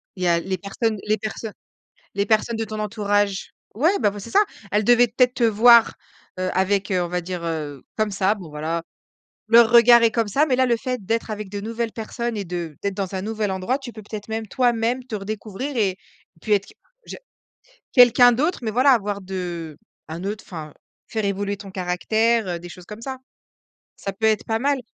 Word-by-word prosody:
il 185 - -5
y - - +2
a 170 -1 +3
les 190 +2 -3
personnes 215 +3 -2
les 215 +1 +2
personnes 215 0 -6 0.6
les 200 0 0
personnes 220 +2 +1
de 225 - -2
ton 215 0 -6
entourage. 205 -2 -1 0.2
Ouais, 325 - +2
bah, 210 -4 +3
vo 205 - -9
c'est 215 +4 -9
ça! 410 +2 +5 0.3
Elles 210 0 +2
devaient 245 +1 +5
peut-être 250 +2 +2
te 240 - +1
voir, 230 +1 +6 0.4
heu, 185 0 -1
avec, 195 +1 0
heu, 185 -1 +1
on 175 - -3
va 180 +1 -1
dire, 180 0 -5
heu, 150 -4 -4
comme 215 -1 0
ça, 195 +1 +1
bon 185 -6 -10
voilà. 160 +3 -3 0.7
Leur 230 0 +7
regard 235 0 +7
est 230 - +5
comme 230 -3 0
ça 290 +9 +2
mais 265 - +1
là, 260 - +3
le 240 -1 +2
fait 250 -2 -4
d'être 225 +3 -1
avec 210 -2 -5
de 205 0 -4
nouvelles 225 +1 -3
personnes 235 +1 -4
et 205 - -3
de 170 -4 -5
d'être 200 -1 -1
dans 195 -1 -4
un 190 - -3
nouvel 215 0 -2
endroit, 190 +7 -1
tu 265 -4 -9
peux 220 - -10
peut-être, 210 0 -8
même 220 0 -3
toi-même, 240 +2 0
te 245 - -7
redécouvrir 215 +6 -5
et 195 -4 +1 0.4
puis 215 - -2
être 200 -1 +2
que - - -16 0.3
je - - -7 0.8
quelqu'un 245 -1 +7
d'autre 305 +9 0
mais 220 - -1
voilà 255 +5 +4
avoir 205 -4 0
de 175 -5 -5 0.3
un 165 +3 -6
autre, 205 +2 -4
enfin, 155 -4 -8 0.3
faire 220 -1 -3
évoluer 200 0 -2
ton 195 -1 -10
caractère, 215 +5 +1
heu, 175 -1 -3
des 175 - -10
choses 180 0 -12
comme 210 +3 -10
ça. 265 +2 -5 0.8
Ça 195 - -5
peut 220 +3 -1
être 215 -1 +2
pas 225 0 -1
mal. 280 +1 +1
210 Hz, 215 wpm, -22 LUFS, 190-235 Hz, 0.8 s, Leur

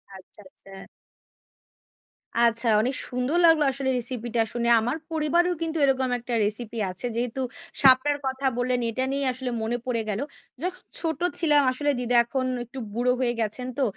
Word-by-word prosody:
আচ্ছা, 190 +2 -15
আচ্ছা। 195 - -18 1.7
আচ্ছা, 235 0 +4
অনেক 255 +3 -1
সুন্দর 250 +6 -1
লাগলো 325 -2 +5
আসলে 265 0 -2
রেসিপিটা 240 -1 +1
শুনে। 235 0 0
আমার 245 +7 -2
পরিবারেও 340 +3 +1
কিন্তু 325 0 -1
এরকম 260 -1 +1
একটা 240 +1 -6
রেসিপি 220 +2 -3
আছে। 185 - +1
যেহেতু 245 +2 -2 0.4
শাপলার 270 +2 +5
কথা 265 +1 -4
বললেন, 250 0 0
এটা 255 +3 -2
নিয়ে 280 0 -1
আসলে 255 0 -4
মনে 230 +2 -1
পড়ে 235 -3 -1
গেল। 210 +2 -2 0.4
যখন 365 +1 -4 0.2
ছোট 320 -2 -2 0.2
ছিলাম 300 -3 +4
আসলে 290 +3 -2
দিদা 245 0 -1
এখন 255 +2 -2 0.2
একটু 260 +3 -9
বুড়ো 245 +2 +1
হয়ে 240 -2 +1
গেছেন 225 +4 -1
তো, 275 - +1
255 Hz, 160 wpm, -25 LUFS, 235-280 Hz, 1.7 s, লাগলো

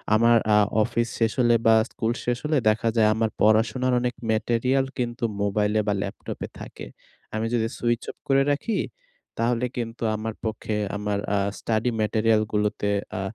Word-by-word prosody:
আমার 115 +1 +5 0.2
আ - - +6 0.3
অফিস 115 +2 -1
শেষ 115 -1 +2
হলে 120 -1 +4
বা 115 0 +7 0.2
স্কুল 115 -1 -1
শেষ 120 0 0
হলে 150 0 +2
দেখা 110 +2 +1
যায় 110 -2 +4
আমার 110 0 +1
পড়াশোনার 115 +5 +3
অনেক 120 -1 -2
ম্যাটেরিয়াল 120 +4 +1
কিন্তু 120 0 -3 0.2
মোবাইলে 105 +1 +1
বা 105 - +2
ল্যাপটপে - - -5
থাকে। - - -9 0.5
আমি 110 +1 -1
যদি 115 -2 +1
সুইচ 120 -1 0
অফ - - -30
করে 135 0 +4
রাখি 195 +9 -1 0.6
তাহলে 120 +1 +1
কিন্তু 115 -1 -4
আমার 110 +1 -4
পক্ষে 110 0 -3 0.2
আমার 105 -1 -2 0.2
আ - - +2 0.2
স্টাডি 115 +2 0
ম্যাটেরিয়ালগুলোতে 110 -1 +1 0.3
আ - - -2
115 Hz, 155 wpm, -25 LUFS, 110-120 Hz, 0.6 s, বা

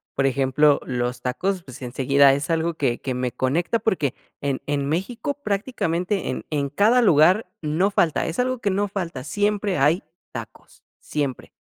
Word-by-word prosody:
por 135 - +1
ejemplo, 135 +2 +3
los 125 -1 -2
tacos, 180 +8 -2
pues 130 0 -12
enseguida 135 +2 +4
es 140 +5 -2
algo 165 +1 +1
que 130 -6 -1
que 130 - -3
me 125 -1 -2
conecta 165 - 0
porque 155 - 0 0.3
en 140 -2 -1
en 145 -1 -1
México 230 - -2
prácticamente 200 -3 -1
en - - -4
en 140 -2 -1
cada 220 - +4
lugar 180 +2 +5
no 160 +5 +1
falta, 170 -6 +1
es 165 - -4
algo 255 0 0
que 205 - 0
no 200 +2 0
falta, 170 -10 -4
siempre 205 +2 0
hay 150 +6 +3 0.3
tacos, - - -10 0.2
siempre. 140 -4 -3
155 Hz, 165 wpm, -23 LUFS, 135-195 Hz, 0.3 s, lugar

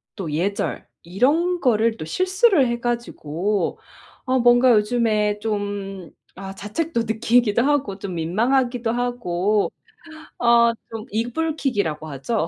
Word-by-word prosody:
또 190 -7 -5
예절 190 +6 -2 0.2
이런 300 - +1
거를 225 -3 +2
또 - - -6
실수를 370 - +2
해 235 0 -2
가지고 210 -5 -2 0.5
어 260 0 +1
뭔가 245 +1 +5
요즘에 210 -2 +1
좀 205 -4 -4 0.3
아 195 0 -7
자책도 230 - -2
느끼기도 225 0 +2
하고 280 -9 0
좀 190 -2 -6
민망하기도 235 +7 0
하고 215 -5 0 0.7
어 235 -1 +5 0.2
좀 225 -1 -7
이불킥이라고 230 - -2
하죠. 160 - -2
225 Hz, 240 characters per minute, -22 LUFS, 200-245 Hz, 0.7 s, 뭔가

